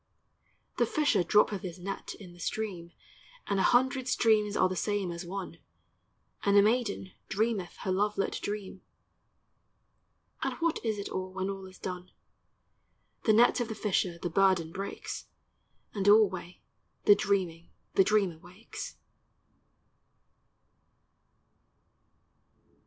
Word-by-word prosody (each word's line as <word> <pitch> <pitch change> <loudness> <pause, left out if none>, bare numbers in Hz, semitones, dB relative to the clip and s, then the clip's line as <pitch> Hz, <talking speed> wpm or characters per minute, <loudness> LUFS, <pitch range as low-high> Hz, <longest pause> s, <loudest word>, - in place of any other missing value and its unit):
The - - +3
fisher 290 - +2
droppeth 205 +1 +3
his 180 -2 -6
net 195 +2 -6
in 180 -4 -12
the 175 - -17
stream, 180 -4 -4 0.5
And 200 -1 0
a - - +3
hundred 260 +3 +3
streams 215 -4 +3
are 185 - +4
the 185 - -3
same 205 -1 -1
as 170 +1 -6
one; 190 0 -6 0.8
And 200 0 +3
the 200 - +8
maiden 215 -4 0 0.2
dreameth 210 -4 -1
her 190 - -1
love 205 +3 +1
lit 195 - -1
dream, 205 -2 -5 1.6
And - - -1
what 335 -1 -1
is 220 -2 -1
it 200 - -5
all, 185 0 -4
when 190 +1 -2
all 195 -1 -7
is 185 - -14
done? 180 -1 -6 1.2
The 220 - +5
net 235 +4 +5
of 240 - -1
the 220 - -5
fisher 185 -5 0
the 175 0 -4
burden 185 -3 +3
breaks, 195 +3 -6 0.7
And 200 -1 -2
alway 195 -4 +3 0.4
the 205 - +9
dreaming 180 -5 -1 0.2
the 195 - +6
dreamer 195 -5 +1
wakes. 185 +7 -9
195 Hz, 130 wpm, -30 LUFS, 185-215 Hz, 1.6 s, the